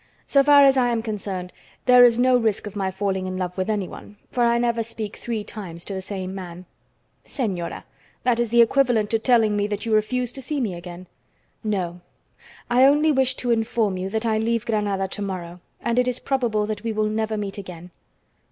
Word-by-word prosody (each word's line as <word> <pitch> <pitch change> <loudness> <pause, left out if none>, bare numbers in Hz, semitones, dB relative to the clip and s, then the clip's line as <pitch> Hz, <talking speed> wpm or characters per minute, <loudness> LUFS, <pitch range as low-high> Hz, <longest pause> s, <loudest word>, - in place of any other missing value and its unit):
So 275 - +4
far 285 0 +7
as 270 -1 +5
I 245 -1 +3
am 230 -2 -1
concerned, 195 -5 -5 0.3
there 250 -1 +8
is 235 -1 +6
no 255 +1 +4
risk 220 -4 +1
of 210 -1 -8
my 195 -2 -1
falling 190 -1 -2
in 185 0 -4
love 180 -1 -3
with 185 +2 -2
anyone, 205 0 -4
for 245 - +1
I 235 0 +3
never 235 -1 +1
speak 220 -2 -5
three 225 -3 -4
times 175 -6 -8
to 200 - -5
the 190 - -4
same 190 -1 -5
man." 180 -2 -8 0.6
"Señora! 195 - -3 0.4
That 245 -2 +2
is 235 -2 0
equivalent 235 -2 +3
to 225 - +2
telling 225 -3 +3
me 205 0 0
that 210 +2 -4
you 225 - -1
refuse 245 +3 +1
to 270 - -8
see 285 +3 -3
me 220 -8 -1
again!" 175 +1 -9 0.6
"No, 180 -5 -2 0.7
I 250 +2 +5
only 295 +3 +4
wish 260 -2 +2
to 245 -2 -1
inform 225 -3 +1
you 185 +1 -3
that 220 +3 -2
I 220 -1 +1
leave 230 0 0
Granada 205 -4 0
to 200 - -5
morrow, 180 -3 -5 0.2
and 235 +1 +1
it 250 - +2
is 250 -1 0
probable 235 -6 0
that 215 0 -4
we 230 - -1
will 215 0 0
never 220 0 -1
meet 200 -1 -4
again." 180 -2 -10
215 Hz, 205 wpm, -23 LUFS, 195-240 Hz, 0.7 s, there